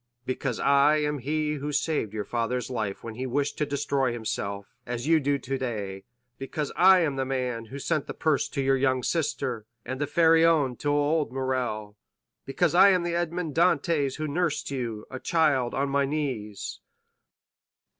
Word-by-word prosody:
"Because 130 Hz, -1 st, -2 dB
I 140 Hz, +2 st, +4 dB
am 150 Hz, -1 st, -1 dB
he 150 Hz, +3 st, -1 dB
who 145 Hz, +1 st, -4 dB
saved 145 Hz, -8 st, 0 dB
your 105 Hz, -1 st, -4 dB
father's 120 Hz, +1 st, -2 dB
life 110 Hz, -5 st, -3 dB
when 115 Hz, -, -6 dB
he 130 Hz, +4 st, -4 dB
wished 140 Hz, +3 st, -1 dB
to 150 Hz, -, 0 dB
destroy 140 Hz, -2 st, 0 dB
himself, 100 Hz, -3 st, -4 dB
as 120 Hz, +1 st, -4 dB
you 160 Hz, +1 st, +4 dB
do 140 Hz, 0 st, +1 dB
today—because 125 Hz, +2 st, -5 dB
I 185 Hz, +1 st, +7 dB
am 145 Hz, -5 st, 0 dB
the 135 Hz, -, +1 dB
man 125 Hz, -3 st, -2 dB
who 130 Hz, +5 st, -8 dB
sent 150 Hz, +1 st, -1 dB
the -, -, -6 dB
purse 155 Hz, -3 st, +1 dB
to 140 Hz, -, -2 dB
your 135 Hz, 0 st, +3 dB
young 130 Hz, -1 st, +1 dB
sister, 135 Hz, -8 st, -2 dB, 0.2 s
and 130 Hz, +3 st, -4 dB
the 145 Hz, -, 0 dB
Pharaon 165 Hz, -5 st, +4 dB
to 145 Hz, -, -2 dB
old 145 Hz, -1 st, +1 dB
Morrel—because 130 Hz, +4 st, -3 dB
I 190 Hz, +3 st, +8 dB
am 185 Hz, -2 st, +3 dB
the 170 Hz, 0 st, -2 dB
Edmond 170 Hz, -2 st, -2 dB
Dantès 160 Hz, -4 st, +2 dB
who 155 Hz, 0 st, -2 dB
nursed 160 Hz, -1 st, -1 dB
you, 115 Hz, -5 st, -4 dB
a 130 Hz, -, -5 dB
child, 145 Hz, -7 st, +1 dB
on 140 Hz, +1 st, 0 dB
my 140 Hz, 0 st, +2 dB
knees." 130 Hz, -8 st, -4 dB
135 Hz, 165 wpm, -27 LUFS, 125-155 Hz, 0.2 s, I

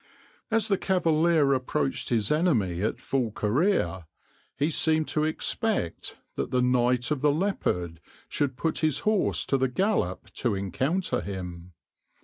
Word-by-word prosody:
As 225 Hz, -2 st, +1 dB
the 195 Hz, -2 st, +1 dB
cavalier 165 Hz, -5 st, +3 dB
approached 135 Hz, +2 st, -1 dB
his 110 Hz, -2 st, +1 dB
enemy 120 Hz, -, +1 dB
at 110 Hz, +3 st, -1 dB
full 130 Hz, -2 st, -1 dB
career, 105 Hz, -, 0 dB, 0.5 s
he 145 Hz, +4 st, +1 dB
seemed 155 Hz, 0 st, +2 dB
to 155 Hz, 0 st, +1 dB
expect 160 Hz, -, -2 dB, 0.2 s
that -, -, -2 dB
the 125 Hz, 0 st, +1 dB
Knight 125 Hz, +1 st, +2 dB
of 145 Hz, -4 st, 0 dB
the 150 Hz, -, +4 dB
Leopard 90 Hz, -, -1 dB, 0.3 s
should 135 Hz, -3 st, -1 dB
put 160 Hz, +1 st, -1 dB
his 155 Hz, -3 st, +1 dB
horse 215 Hz, -2 st, +1 dB
to 135 Hz, -, +1 dB
the 130 Hz, -, +2 dB
gallop 125 Hz, -, -1 dB
to 120 Hz, -5 st, -1 dB
encounter 130 Hz, -, -1 dB
him. 90 Hz, -2 st, -7 dB
135 Hz, 140 wpm, -27 LUFS, 105-165 Hz, 0.5 s, the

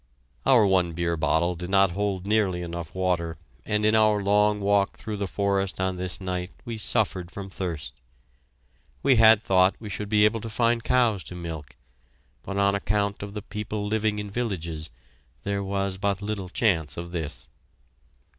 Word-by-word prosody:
Our 120 Hz, -5 st, +6 dB
one 90 Hz, -3 st, +2 dB
beer 85 Hz, 0 st, -1 dB
bottle 80 Hz, +3 st, +1 dB
did 90 Hz, +1 st, -6 dB
not 95 Hz, -1 st, +4 dB
hold 95 Hz, 0 st, -2 dB
nearly 100 Hz, -4 st, +1 dB
enough 85 Hz, -1 st, -6 dB
water, 85 Hz, -4 st, -1 dB, 0.3 s
and 105 Hz, 0 st, +1 dB
in 110 Hz, -, +4 dB
our 110 Hz, -2 st, +4 dB
long 105 Hz, +1 st, +3 dB
walk 100 Hz, -1 st, +1 dB
through 110 Hz, -2 st, -5 dB
the 100 Hz, -1 st, -2 dB
forest 100 Hz, -1 st, -1 dB
on 95 Hz, -1 st, 0 dB
this 90 Hz, 0 st, -1 dB
night 90 Hz, -1 st, -3 dB, 0.2 s
we 115 Hz, -2 st, -4 dB
suffered 90 Hz, -3 st, 0 dB
from 95 Hz, +1 st, -8 dB
thirst. 80 Hz, -10 st, -5 dB, 1.0 s
We 135 Hz, -3 st, +5 dB
had 110 Hz, -1 st, +7 dB
thought 95 Hz, -1 st, +4 dB
we 105 Hz, -2 st, -7 dB
should 105 Hz, +1 st, -4 dB
be 105 Hz, -1 st, +5 dB
able 110 Hz, +1 st, +1 dB
to 115 Hz, -, -6 dB
find 115 Hz, +1 st, +1 dB
cows 120 Hz, -6 st, +2 dB
to 90 Hz, -, -7 dB
milk, 80 Hz, -5 st, -7 dB, 0.7 s
but 100 Hz, -, -5 dB
on 100 Hz, 0 st, +3 dB
account 100 Hz, 0 st, 0 dB
of 100 Hz, 0 st, -6 dB
the 105 Hz, -2 st, -6 dB
people 105 Hz, 0 st, -4 dB
living 110 Hz, 0 st, 0 dB
in 105 Hz, -1 st, -5 dB
villages, 85 Hz, -9 st, -3 dB, 0.5 s
there 100 Hz, 0 st, -1 dB
was 95 Hz, -1 st, -2 dB
but 100 Hz, -1 st, 0 dB
little 105 Hz, -3 st, -4 dB
chance 90 Hz, -7 st, +1 dB
of 85 Hz, 0 st, -6 dB
this. 80 Hz, -4 st, -5 dB
100 Hz, 175 wpm, -26 LUFS, 90-105 Hz, 1.0 s, had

